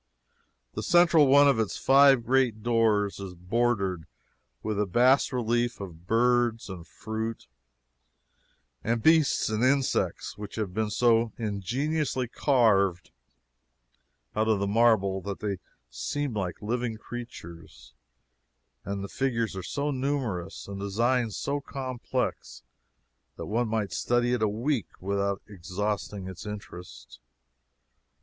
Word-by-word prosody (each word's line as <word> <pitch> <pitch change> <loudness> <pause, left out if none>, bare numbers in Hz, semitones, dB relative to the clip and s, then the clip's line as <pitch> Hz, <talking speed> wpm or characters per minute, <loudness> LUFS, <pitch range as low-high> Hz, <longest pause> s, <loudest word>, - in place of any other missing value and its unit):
The - - -4
central 170 -4 +5
one 145 +2 +7
of 135 -5 +3
its 110 -3 -1
five 135 -3 +5
great 125 -4 +1
doors 110 -4 +2
is 95 -2 -7
bordered 95 -2 0 0.6
with 105 -1 -2
a 105 - +1
bas 125 +9 +4
relief 120 -1 0
of 90 -3 -9
birds 120 0 +2
and 90 -3 -8
fruits 110 +1 -5 1.4
and 115 0 -1
beasts 160 -3 +4
and 110 +2 -1
insects, 135 -4 0
which 105 -1 -7
have 105 -5 -3
been 110 +1 -1
so 115 0 +2
ingeniously 125 - -1
carved 105 - +2 1.2
out 110 +1 +1
of 110 -2 +3
the 100 - 0
marble 100 -3 +3
that 100 +1 -5
they 100 -3 -3 0.3
seem 145 - -3
like 95 -2 -4
living 115 +1 -2
creatures 85 - -10 0.9
and 100 0 -4
the - - -4
figures 115 -4 -1
are 95 - -4
so 145 +10 -2
numerous 130 -9 -3
and 100 0 -6
the - - -3
design 120 +4 +1
so 140 +7 -2
complex 130 -3 -4 0.7
that - - -6
one 115 +3 0
might 110 -3 -1
study 120 0 +1
it 125 - 0
a 110 - +3
week 120 +3 -1
without 100 +1 -1
exhausting 100 +1 -4
its 95 -2 -8
interest. 85 - -9
110 Hz, 130 wpm, -27 LUFS, 100-125 Hz, 1.4 s, one